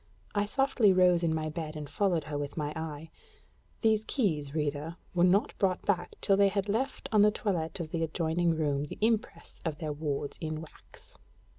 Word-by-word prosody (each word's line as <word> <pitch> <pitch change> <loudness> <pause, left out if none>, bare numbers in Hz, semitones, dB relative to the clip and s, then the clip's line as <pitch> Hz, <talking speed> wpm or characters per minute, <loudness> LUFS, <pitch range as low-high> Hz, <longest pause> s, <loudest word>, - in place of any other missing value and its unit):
I 205 0 +1
softly 250 -4 +3
rose 180 -2 +5
in 165 -2 +1
my 155 -1 -1
bed 155 -1 -5
and 150 -1 -5
followed 170 +1 +1
her 150 0 -6
with 145 +1 -4
my 150 -1 -2
eye: 160 -1 -6 0.7
these 220 -1 +3
keys, 155 - 0
reader, 150 +1 -2 0.2
were 175 -1 +3
not 185 +4 +3
brought 185 -2 +1
back 195 -3 0
till 195 - +4
they 200 0 +5
had 195 0 -1
left 235 +7 -1
on 215 -2 +5
the 210 - +7
toilet 185 -6 -2
of 160 -2 -5
the 165 - -1
adjoining 165 +1 +1
room 145 -2 0
the - - -8
impress 220 +1 -1
of 160 -3 -2
their 155 -2 -3
wards 145 -1 -3
in 155 -1 -3
wax. 160 -1 -14
165 Hz, 190 wpm, -30 LUFS, 155-200 Hz, 0.7 s, the